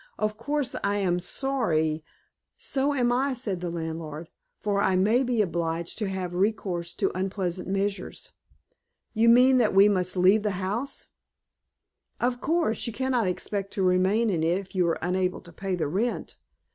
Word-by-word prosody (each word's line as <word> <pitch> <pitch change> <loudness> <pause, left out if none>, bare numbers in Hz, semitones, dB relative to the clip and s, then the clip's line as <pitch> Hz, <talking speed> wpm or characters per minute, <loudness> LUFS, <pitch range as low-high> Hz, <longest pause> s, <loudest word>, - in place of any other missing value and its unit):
Of 215 0 -1
course 285 +4 -2
I 200 0 +1
am 180 -3 +1
sorry 170 - 0 0.3
" - - -58 0.2
"So 275 +1 0
am 245 -2 +2
I," 260 +2 +1
said 205 -7 -3
the 175 - -2
landlord, 160 -1 -5 0.3
"for 200 -1 0
I 190 -2 +2
may 215 +7 +3
be 240 -4 +2
obliged 170 -1 -2
to 210 -3 -1
have 185 -2 -4
recourse 180 -3 -1
to - - 0
unpleasant 185 -1 -2
measures." 195 +1 -3 0.8
"You 230 +1 +4
mean 255 +2 +6
that 215 -5 +2
we 195 +1 +8
must 185 -2 0
leave 190 +4 +5
the 205 -3 -2
house!" 210 +9 -3 1.1
"Of 245 0 0
course, 315 -8 0
you 235 - -4
cannot 255 -3 0
expect 195 +2 -3
to 195 - -1
remain 190 +5 +3
in 170 -4 0
it 165 +3 +2
if 195 -1 -8
you 180 -3 +2
are 165 - +1
unable 180 +1 0
to 170 -2 -14
pay 190 +2 -3
the 170 - -1
rent. 205 +11 -2
195 Hz, 170 wpm, -26 LUFS, 180-230 Hz, 1.1 s, we